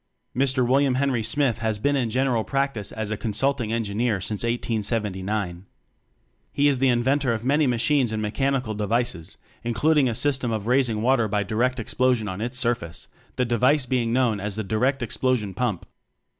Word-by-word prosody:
Mr. 130 -1 +2
William 135 0 +3
Henry 130 -3 +1
Smyth 125 0 +1
has 110 -2 -1
been 145 +7 +1
in 125 -4 0
general 125 -1 +1
practice 135 -7 -1
as 110 -1 -4
a 110 - -2
con 110 -1 -3
sulting 135 -1 0
engineer 115 -1 0
since 105 +2 -3
1879. 105 -5 -2 0.8
He 145 +1 +2
is 140 -3 +2
the 135 - +3
inventor 130 +1 +2
of 115 +1 -4
many 145 +2 +3
machines 125 +1 +2
and 110 - -2
mechanical 130 +2 -1
devices, 105 -4 -2 0.3
including 135 +4 +2
a 115 - -2
system 130 -2 0
of 110 -2 -3
raising 120 -3 +1
water 125 -2 +3
by 105 0 0
direct 120 +6 0
explosion 125 -1 0
on 95 +1 -5
its 120 +3 -3
surface, 120 -10 -2 0.3
the 125 - +1
device 125 +4 +2
being 125 -3 0
known 120 -4 +1
as 100 0 -3
the 110 - -2
"direct 125 +7 0
explo 130 +2 +1
sion 105 -4 -6
pump." 105 -3 -2
120 Hz, 175 wpm, -24 LUFS, 110-130 Hz, 0.8 s, William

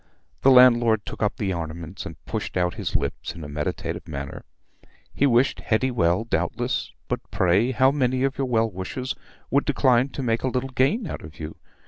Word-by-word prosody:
The 135 - +6
landlord 120 -4 +6
took - - -7
up 105 -1 0
the 95 -3 -1
ornaments 85 +2 -6
and 80 - -12
pushed - - -4
out 90 -1 +1
his - - -4
lips - - -2
in 85 - -8
a - - -6
meditative 75 +3 -4
manner. 70 -3 -6 0.7
He 140 - +3
wished 125 +1 +3
Hetty 130 +3 +1
well, 90 -3 +2
doubtless; 115 - -1 0.2
but - - -1
pray, 95 +7 +2
how 130 +1 +4
many 130 -2 +1
of 135 0 +1
your 135 -1 -1
well 115 -2 +1
wishers 100 +8 -4 0.4
would 140 +1 +3
decline 130 0 +3
to 135 - -5
make 115 -2 +1
a - - -1
little 130 +1 -2
gain 140 - +1
out - - -5
of 80 +2 -12
you? 80 0 -6
115 Hz, 190 wpm, -24 LUFS, 90-130 Hz, 0.7 s, The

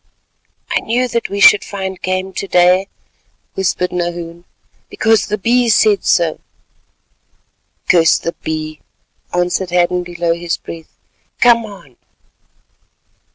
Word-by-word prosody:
"I - - +2
knew 245 +3 -1
that 235 0 -2
we 200 - -4
should 205 +1 +7
find 190 -2 -6
game 185 +1 -3
to 195 - -5
day," 180 +1 +3 0.7
whispered 180 -1 -1
Nahoon, 175 -1 -5 0.4
"because 220 -3 +1
the 210 - -2
Bee 240 +4 +1
said 210 -2 +3
so." 165 -2 +1 1.5
"Curse 165 -2 +4
the 170 - -4
Bee," 155 -1 -5 0.5
answered 180 +1 -1
Hadden 180 0 +1
below 175 -1 -2
his 170 0 -3
breath. 165 -1 -11 0.4
"Come 235 -1 +4
on." 145 - -14
180 Hz, 115 wpm, -16 LUFS, 170-200 Hz, 1.5 s, should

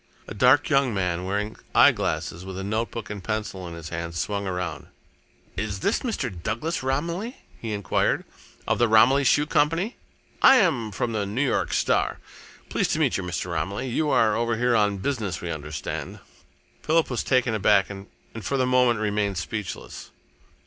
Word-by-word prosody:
A - - -6
dark 125 +7 +4
young 135 -6 +2
man, 90 -2 -1
wearing 105 +3 -2 0.2
eyeglasses, 85 +2 +3
with 95 0 -7
a 95 - -4
notebook 110 0 -3
and 100 -3 -6
pencil 105 -3 -3
in 85 - -7
his 85 -1 -8
hand, 85 0 -5
swung 100 +3 -2
around. 90 -3 -4 0.7
"Is 100 0 -3
this 205 - +1
Mr. 225 - -2
Douglas 155 - -2
Romilly," 170 - -2 0.2
he 115 - -5
enquired, 100 -5 0 0.4
"of - - +1
the 120 - +4
Romilly 120 +6 +5
Shoe 145 +3 +4
Company? 165 - +1 0.4
I 270 - +8
am 145 - +2
from 115 +4 -2
the 105 -3 -1
New 120 +8 0
York - - 0
Star. - - +1 0.5
Pleased - - 0
to - - -1
meet - - +2
you, - - -1
Mr. 90 0 -4
Romilly. 100 +10 -2
You 150 +5 0
are 110 -6 +3
over 115 -1 0
here 125 0 +2
on 105 -2 +2
business, 105 -5 -2
we 85 - -4
understand?" 75 -2 -5 0.6
Philip 160 -2 +2
was 120 - -1
taken 125 -3 +2
aback 100 -2 +3
and 100 0 -9 0.3
for 140 - -1
the 130 - +2
moment 125 -3 +3
remained 105 -2 0
speechless. 90 +5 -5
110 Hz, 170 wpm, -25 LUFS, 95-130 Hz, 0.7 s, I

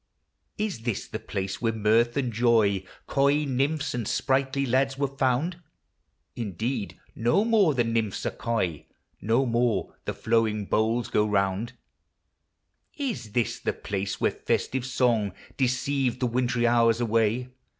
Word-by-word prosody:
Is 210 - -2
this 115 -2 -3
the - - -5
place 95 0 -4
where 115 -2 +2
mirth 110 +3 +2
and 125 -4 -1
joy, 110 -4 +3 0.2
Coy 140 +2 +2
nymphs, 140 +3 0
and 120 -4 -3
sprightly 135 0 +1
lads 135 +2 +1
were 140 - +1
found? 135 +6 0 0.7
Indeed! 110 +1 -3
no 120 - +2
more 205 -10 +4
the 120 - +3
nymphs 115 -3 -1
are - - 0
coy, 90 -10 -2 0.3
No 115 +6 +2
more 120 -4 0
the - - -3
flowing 110 -2 +1
bowls 110 +4 +1
go 105 - +2
round. 100 +3 0 1.2
Is 135 - -4
this 120 -1 0
the - - -1
place 100 0 -4
where - - +2
festive 130 -1 -1
song 120 -6 +1 0.2
Deceived 130 0 0
the 125 - +1
wintry 120 0 +1
hours 115 -1 +4
away 115 +1 +1
120 Hz, 140 wpm, -26 LUFS, 110-135 Hz, 1.2 s, more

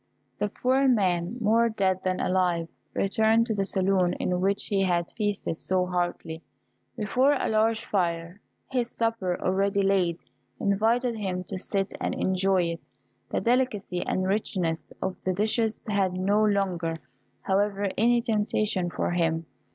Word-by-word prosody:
The 210 - 0
poor 260 +5 +2
man, 190 -4 +1
more 230 +1 +3
dead 190 -4 0
than 185 0 0
alive, 180 -3 +1 0.3
returned 220 +3 +3
to 230 - -1
the 200 -2 0
saloon 190 -2 +2
in 180 0 -1
which 200 +1 +1
he 200 -2 0
had 175 -2 0
feasted 205 -6 -2
so 185 -1 0
heartily. 175 -2 -3 0.6
Before 255 +7 +2
a 280 - -1
large 220 +1 +1
fire 170 0 -2 0.3
his 245 -2 0
supper, 225 -7 -1
already 195 +1 +1
laid, 185 -4 +1 0.4
invited 225 +5 +1
him 185 -4 -3
to 185 +1 -6
sit 195 0 -2
and - - -1
enjoy 190 0 +2
it. 170 0 -4 0.4
The - - -1
delicacy 230 -7 0
and 185 - -1
richness 185 -5 -1
of 190 -1 -3
the 185 - 0
dishes 220 +3 0
had 195 -3 +1
no 200 +4 +2
longer, 185 -5 0 0.5
however, 200 +1 +1
any 235 +2 +3
temptation 210 -4 0
for - - -2
him. 165 -2 0
195 Hz, 145 wpm, -27 LUFS, 180-215 Hz, 0.6 s, more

